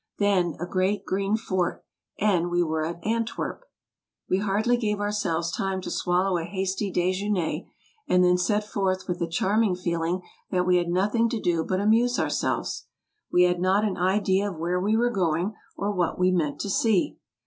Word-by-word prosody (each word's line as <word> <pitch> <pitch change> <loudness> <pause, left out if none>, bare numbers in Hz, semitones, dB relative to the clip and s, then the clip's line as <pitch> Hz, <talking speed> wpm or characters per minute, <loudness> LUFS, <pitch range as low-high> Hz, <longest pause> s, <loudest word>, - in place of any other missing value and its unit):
Then 185 -6 +2
a 175 - -2
great 185 +3 0
green 195 +3 0
fort, 185 -5 -2 0.3
and 180 -5 +2
we 175 0 +2
were 160 -1 -1
at 170 +1 -5
Antwerp. 230 - -2 0.6
We 185 - +1
hardly 210 +4 +1
gave 210 -4 -1
ourselves 195 -5 -1
time 190 +1 -2
to - - -5
swallow 180 0 +1
a - - -3
hasty 190 +3 -2
dejeuner, 185 0 -1 0.4
and 180 0 +4
then 180 0 +4
set 210 +3 +1
forth 190 -3 -1
with 180 -1 -2
the 170 - -1
charming 200 +3 +2
feeling 175 0 -2 0.3
that 180 -1 +1
we 180 0 +4
had 175 -1 0
nothing 205 +6 +2
to 230 - -2
do 170 -4 +1
but 185 +2 -1
amuse 230 +4 +3
ourselves. - - -1 0.4
We 180 - +5
had 180 0 +2
not 195 +3 +3
an 205 - -1
idea 190 +2 +2
of 180 - -8
where 175 +3 -1
we 210 +4 +1
were 240 +1 +2
going, 180 -1 0 0.2
or 200 +1 -1
what 180 -4 -1
we 185 0 +3
meant 160 -5 0
to 200 - -3
see. 210 -3 +1
185 Hz, 180 wpm, -26 LUFS, 175-205 Hz, 0.6 s, We